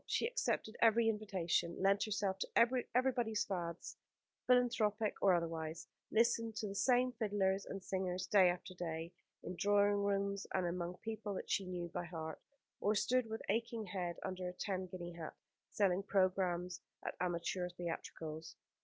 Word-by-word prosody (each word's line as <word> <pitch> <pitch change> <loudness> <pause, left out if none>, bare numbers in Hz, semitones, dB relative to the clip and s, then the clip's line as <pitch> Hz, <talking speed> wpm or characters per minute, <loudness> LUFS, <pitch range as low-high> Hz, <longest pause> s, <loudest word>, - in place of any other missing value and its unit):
She - - +1
accepted 460 - -1
every 230 0 +5
invitation, 190 -6 0
lent 195 +1 +3
herself 200 -3 -1
to - - -2 0.5
everybody's 245 -4 +2
fads, 170 -3 -4 0.5
philanthropic 225 -4 +3
or 190 -2 +6
otherwise; 165 -1 -3 0.2
listened 230 0 +2
to 215 - -2
the 195 - -4
same 250 +4 +3
fiddlers 200 -4 0
and 195 -1 -5
singers 185 -1 -2
day 190 -2 +6
after 180 +1 -3
day, 165 -1 -4 0.3
in 180 - -5
drawing 205 +1 +3
rooms 200 0 0
and 185 -1 +2
among 175 +1 -2
people 215 -2 -4
that - - -5
she 195 - +1
knew 175 -1 -3
by 175 - -3
heart; 160 -2 -6 0.4
or 210 +2 +2
stood 250 +3 +2
with 220 0 -4
aching 230 +1 -1
head 180 -3 -3
under 185 -1 -3
a - - -7
ten 185 0 -3
guinea 175 -1 -6
hat, 165 -2 -7 0.3
selling 195 -2 +2
programmes 185 -2 +1 0.2
at - - -2
amateur 180 0 -1
theatricals. 165 -2 -5
190 Hz, 155 wpm, -37 LUFS, 175-215 Hz, 0.5 s, or